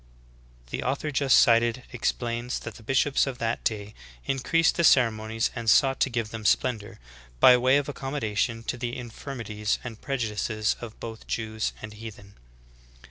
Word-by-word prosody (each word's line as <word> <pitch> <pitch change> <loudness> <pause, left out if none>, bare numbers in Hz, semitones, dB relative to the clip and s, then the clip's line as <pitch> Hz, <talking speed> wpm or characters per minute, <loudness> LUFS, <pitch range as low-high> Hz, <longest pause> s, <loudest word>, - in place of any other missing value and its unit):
"^ - - -22
The - - -3
author 140 +4 -2
just 140 -2 +4
cited 115 +1 +3
explains 120 0 -2
that 110 - -7
the 115 - -14
bishops 135 +4 +2
of 130 -2 -4
that 115 0 -2
day 105 -1 -2 0.3
increased 165 +5 +2
the 170 - +2
ceremonies 115 -5 +3
and 115 -2 -1
sought 135 +3 +4
to - - +2
give 115 -3 -3
them 115 -1 -6
splendor 110 -1 0 0.4
''by 125 - +7
way 130 +2 +5
of 145 - -1
accommodation 115 -5 -2
to 120 - -3
the 120 -1 -3
infirmities 115 -3 -4
and 115 -3 -8
prejudices 110 -4 -1
of 115 -2 -9
both 115 -1 -8
Jews 110 -1 -2
and 110 -1 -7
heathen." 105 -2 -10
115 Hz, 160 wpm, -26 LUFS, 110-130 Hz, 0.4 s, by